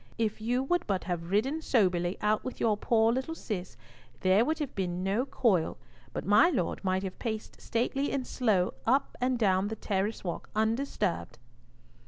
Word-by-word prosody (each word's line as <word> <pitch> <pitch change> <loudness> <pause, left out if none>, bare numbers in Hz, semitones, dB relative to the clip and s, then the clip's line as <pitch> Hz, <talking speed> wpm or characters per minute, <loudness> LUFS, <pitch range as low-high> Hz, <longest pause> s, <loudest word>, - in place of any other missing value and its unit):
If 220 -1 -1
you 245 +4 +1
would 350 +6 0
but 195 -2 0
have 175 -2 -3
ridden 260 +11 +1
soberly 180 - +2
out 210 0 +2
with 255 - -6
your 220 -2 +3
poor 225 +2 +3
little 265 +6 -2
Cis, 185 - -5 0.4
there 190 +4 +4
would 315 +5 0
have 295 -4 -4
been 180 -2 -2
no 205 +8 0
coil, 190 -13 +1 0.3
but - - -4
my 210 - +6
Lord 195 - -1
might 190 0 0
have 190 -1 -6
paced 220 -2 -5
stately 270 +5 -1
and 265 -2 -1
slow 210 -10 +1
up 265 +4 +2
and 250 0 +2
down 195 -3 +2
the 220 - -3
terrace 200 +1 -2
walk 175 -3 -5
undisturbed." 220 -3 -1
215 Hz, 175 wpm, -30 LUFS, 190-250 Hz, 0.4 s, my